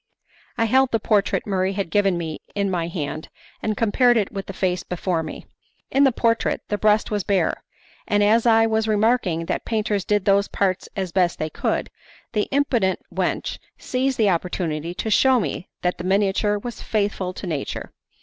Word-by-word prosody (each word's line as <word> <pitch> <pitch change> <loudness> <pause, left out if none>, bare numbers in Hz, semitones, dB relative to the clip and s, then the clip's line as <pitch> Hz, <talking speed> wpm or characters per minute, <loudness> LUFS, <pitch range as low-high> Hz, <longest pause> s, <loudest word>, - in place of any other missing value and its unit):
I 230 - +2
held 260 +3 +3
the 225 - +2
portrait 205 -1 +1
Murray 190 -1 0
had 195 -4 -3
given 195 -2 +2
me 160 -2 -4 0.2
in 200 -1 0
my 170 -2 -1
hand, 155 -2 -5 0.3
and 215 -2 -1
compared 240 +2 +3
it 205 -3 0
with 195 -1 -5
the - - -4
face 180 -2 -1
before 180 -1 -2
me. 155 - -7 0.5
In 275 +1 +4
the 270 - +5
portrait 230 -1 +1
the 210 - 0
breast 215 +1 +3
was 205 -2 0
bare, 195 -1 0 0.4
and 205 -1 +2
as 225 +3 +4
I 225 -1 +5
was 220 0 +1
remarking 210 -6 +1
that - - -2
painters 215 -3 -1
did 205 -1 0
those 200 0 +3
parts 190 -2 -1
as 190 -3 -3
best 180 -1 +2
they 155 0 -3
could, - - -2 0.4
the 210 -2 0
impudent 245 -9 +1
wench - - -2 0.2
seized 260 +1 -1
the 210 -3 +4
opportunity 170 -2 -2
to 220 - -3
shew 260 +3 +5
me 175 -2 -4
that 180 0 0
the - - -4
miniature 200 +2 +2
was 240 +3 -7
faithful 200 -3 -1
to 190 - -7
nature. 155 -6 -4
200 Hz, 185 wpm, -23 LUFS, 180-220 Hz, 0.5 s, the